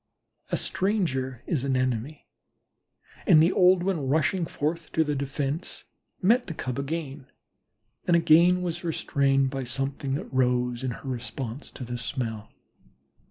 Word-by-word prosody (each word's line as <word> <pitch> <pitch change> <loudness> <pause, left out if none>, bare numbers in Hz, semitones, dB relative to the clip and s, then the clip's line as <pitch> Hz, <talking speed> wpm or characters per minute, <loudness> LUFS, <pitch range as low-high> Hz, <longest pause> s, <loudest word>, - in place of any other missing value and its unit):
A - - +2
stranger 135 - -1
is 150 -8 -1
an 135 -1 +1
enemy, 130 +3 -2 1.0
and 155 - +7
the 165 +4 +5
old 180 -1 +5
one 175 -8 -1
rushing 160 +5 +1
forth 155 +2 -3
to 160 - +3
the 150 -1 -1
defense, 140 +3 -3 0.4
met 240 +6 +4
the 165 - -5
Cub 130 -1 -4
again, 140 -2 -4 0.8
and 175 - +5
again 170 +2 +5
was 175 0 -3
restrained 135 -5 +1
by 135 -1 -3
something 135 +2 -2
that 140 - -6
rose 125 -1 +1
in 130 - -1
her 125 +3 -7
responsive 125 +1 -5
to - - -6
the 120 0 -5
smell. 115 -4 -4
140 Hz, 145 wpm, -27 LUFS, 130-165 Hz, 1.0 s, and